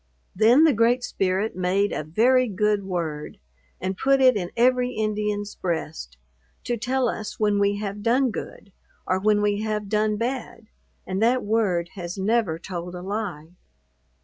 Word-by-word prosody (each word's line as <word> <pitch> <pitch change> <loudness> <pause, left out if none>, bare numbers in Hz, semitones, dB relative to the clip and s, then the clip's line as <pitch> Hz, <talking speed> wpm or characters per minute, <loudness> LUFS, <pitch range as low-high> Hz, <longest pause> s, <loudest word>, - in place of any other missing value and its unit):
Then 230 - +5
the 315 -3 +5
Great 235 +3 +2
Spirit 190 +1 -1
made 185 +3 +1
a - - -3
very 245 - +3
good 210 0 0
word, 165 -5 -4 0.4
and 190 +1 -3
put 270 +7 +2
it 255 -2 +6
in 180 -4 -2
every 250 +1 +3
Indians 210 -1 -2
breast, 160 - -4 0.5
to 240 - -1
tell 255 +3 0
us 215 -2 -5
when 210 -1 +2
we 200 0 +2
have 205 0 -5
done 245 +3 +2
good, 200 -2 -8 0.3
or 185 - 0
when 210 +1 +2
we 205 0 +1
have 210 -2 -3
done 215 0 +1
bad; 230 -1 -4 0.4
and 190 +2 -3
that 245 +3 +3
word 200 -6 0
has 175 -2 -6
never 195 -4 +1
told 175 0 -6
a 180 - -7
lie. 190 -6 -4
210 Hz, 160 wpm, -24 LUFS, 185-230 Hz, 0.5 s, it